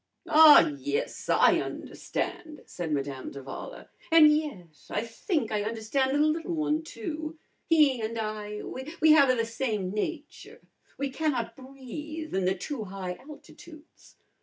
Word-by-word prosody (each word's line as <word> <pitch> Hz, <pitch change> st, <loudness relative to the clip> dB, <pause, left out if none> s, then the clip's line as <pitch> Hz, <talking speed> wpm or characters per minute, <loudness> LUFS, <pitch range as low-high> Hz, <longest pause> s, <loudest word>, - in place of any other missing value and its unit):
"Ah, 305 Hz, -, +8 dB
yes, 140 Hz, +2 st, -3 dB
I -, -, +5 dB
understand," 335 Hz, -5 st, -5 dB
said 170 Hz, -3 st, -5 dB
Madame 140 Hz, -2 st, -3 dB
d'Avala. 135 Hz, -1 st, -9 dB, 0.2 s
"And 305 Hz, -2 st, +7 dB
yet 280 Hz, -, -4 dB, 0.2 s
I -, -, -1 dB
think 235 Hz, -, -2 dB
I 210 Hz, -1 st, 0 dB
understand 230 Hz, +5 st, -1 dB
the -, -, +2 dB
little 330 Hz, +3 st, -1 dB
one, 310 Hz, 0 st, 0 dB
too. 315 Hz, +2 st, -6 dB, 0.3 s
He 295 Hz, -7 st, +4 dB
and 225 Hz, +1 st, -3 dB
I 210 Hz, -1 st, -4 dB
we 310 Hz, +4 st, 0 dB
have 285 Hz, -3 st, +6 dB
the 230 Hz, -, +1 dB
same 225 Hz, -5 st, -2 dB
nature. 320 Hz, -, -5 dB, 0.4 s
We 280 Hz, -1 st, -2 dB
cannot 265 Hz, -5 st, -2 dB
breathe 285 Hz, +4 st, -8 dB
in 190 Hz, -1 st, 0 dB
the 185 Hz, +1 st, +2 dB
too 220 Hz, +4 st, -5 dB
high 190 Hz, -2 st, -5 dB
altitudes. 300 Hz, -, -15 dB
270 Hz, 135 wpm, -28 LUFS, 210-310 Hz, 0.4 s, Ah